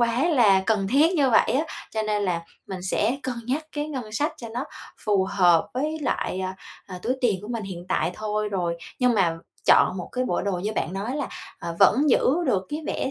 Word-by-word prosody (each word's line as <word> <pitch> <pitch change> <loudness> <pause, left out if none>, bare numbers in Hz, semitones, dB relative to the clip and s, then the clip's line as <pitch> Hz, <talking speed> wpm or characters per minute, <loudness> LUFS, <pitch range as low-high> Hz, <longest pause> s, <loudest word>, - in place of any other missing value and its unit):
quá 235 +4 +2
là 210 - +5
cần 210 -4 +1
thiết 305 - +4
như 275 -5 +3
vậy - - +4
á. 290 +5 +2 0.3
Cho 220 -1 -1
nên 210 -1 0
là 175 -3 -1 0.2
mình 185 -2 -6
sẽ 215 +7 +1
cân 255 -1 -2
nhắc 300 +5 -1
cái 295 0 -3
ngân 250 -8 -5
sách 290 +8 0
cho 230 - -8
nó 245 +4 -4 0.3
phù 200 -3 +1
hợp 175 -4 +4
với 305 +4 -1
lại, 190 -8 -1
à, 185 0 -3 0.3
à, 185 -2 -7
túi 250 +3 0
tiền 215 -6 +2
của 210 - -8
mình 230 -3 -3
hiện 180 -2 -7
tại - - +1
thôi 210 0 -2
rồi. 175 -4 -1 0.2
Nhưng 250 -2 +3
mà 170 -5 +2 0.3
chọn 185 - +5
một 180 - -5
cái 255 0 0
bộ 175 - -1
đồ 200 0 -1
như 195 +5 -2
bạn 180 - -2
nói 215 +8 -3
là, 285 - -2 0.3
ờ, 170 0 -5
vẫn 285 +3 +5
giữ - - +4 0.2
được 190 -1 +1
cái 300 +2 -3
vẻ 265 - -2
215 Hz, 230 wpm, -25 LUFS, 190-255 Hz, 0.3 s, là